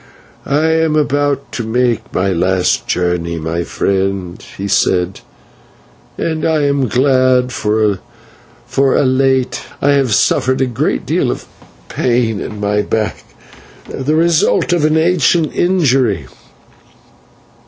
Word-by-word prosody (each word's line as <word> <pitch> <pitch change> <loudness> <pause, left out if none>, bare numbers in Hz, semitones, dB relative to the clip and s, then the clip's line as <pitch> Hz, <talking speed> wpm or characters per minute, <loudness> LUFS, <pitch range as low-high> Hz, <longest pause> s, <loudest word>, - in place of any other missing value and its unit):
"I 145 +3 +1
am 160 -1 +2
about 145 -2 0
to 120 - -4
make 120 0 -1
my 95 +1 0
last 90 +1 0
journey, 90 -1 -1 0.3
friend," 95 -2 -2
he 100 - -4
said, 90 -1 +1 1.0
"and 160 -2 -2
I 155 -2 +1
am 140 -2 +1
glad, 130 0 +2
for 110 -1 0
of 100 -3 0 1.1
late 130 0 +1 0.2
I 145 - +2
have 135 -6 +2
suffered 130 0 +1
a 130 - +2
great 115 - -2
deal - - 0
of - - -4 0.4
pain 120 -4 0
in 105 - -6
my 105 0 0
back, 110 +1 -2 0.6
the 140 +4 -2
result 170 +1 +2
of 165 -4 +2
an 155 +1 +2
ancient 165 -1 +2
injury. 135 - +1
130 Hz, 120 wpm, -15 LUFS, 100-145 Hz, 1.1 s, am